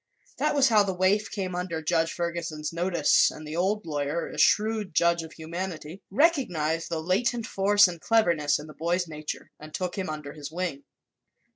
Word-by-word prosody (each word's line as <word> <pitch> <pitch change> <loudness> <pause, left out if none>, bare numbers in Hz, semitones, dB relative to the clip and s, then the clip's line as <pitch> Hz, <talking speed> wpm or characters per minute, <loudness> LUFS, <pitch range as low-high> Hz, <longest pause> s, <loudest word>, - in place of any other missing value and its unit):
That - - +1
was 275 -2 +5
how 215 -2 +5
the 195 -2 -1
waif 190 +3 +2
came 190 -3 -4
under 175 -2 -3
Judge 165 +1 +1
Ferguson's 170 -3 -4
notice 170 -3 +3
and 155 - -9
the 155 - -5
old 200 +5 0
lawyer, 150 +1 -2
a - - -7
shrewd 215 -4 +2
judge 170 0 +3
of 160 -1 -10
humanity, 170 +1 -6
recognized 185 - +1
the 165 -2 -2
latent 230 +6 0
force 205 0 +4
and 170 -2 -7
cleverness 170 -10 +2
in 150 - -9
the 155 - -11
boy's 175 +3 -1
nature 155 -1 -7
and 155 0 -9
took 180 -1 -3
him 185 - -3
under 150 -2 -6
his 150 -1 -8
wing. 165 -5 -4
170 Hz, 180 wpm, -27 LUFS, 155-195 Hz, -, was